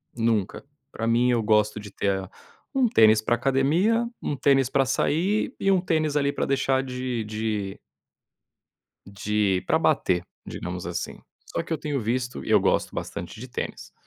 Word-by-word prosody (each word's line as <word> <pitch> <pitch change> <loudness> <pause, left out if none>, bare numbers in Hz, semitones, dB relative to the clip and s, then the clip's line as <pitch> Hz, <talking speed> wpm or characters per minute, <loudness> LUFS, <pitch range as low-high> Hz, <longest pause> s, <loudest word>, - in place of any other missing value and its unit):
nunca, 115 -4 0 0.3
pra 115 +1 -3
mim 120 +2 +3
eu 120 - +2
gosto 105 0 +2
de 105 -1 -9
ter 95 -1 -1 0.4
um 260 -4 +3
tênis 110 - +5
para 120 +2 +1
academia, 150 - +2 0.2
um 145 - -2
tênis 135 -1 +3
para 135 0 +2
sair 180 - 0
e 195 - +2
um 190 - +4
tênis, 155 -4 0
ali, 140 0 +2
para - - -1
deixar 135 -1 +1
de 125 -3 -3
de 105 -2 -3 1.3
de, 100 -1 0
pra - - +3
bater, 90 -1 +2 0.2
digamos 90 0 -5
assim. 85 0 -4 0.3
Só - - -3
que 165 - -6
eu 160 - 0
tenho 145 -2 -2
visto 125 +3 -2
e - - -5
eu - - +6
gosto - - +1
bastante 90 +5 -6
de 130 - -8
tênis, - - -6
125 Hz, 165 wpm, -25 LUFS, 105-140 Hz, 1.3 s, eu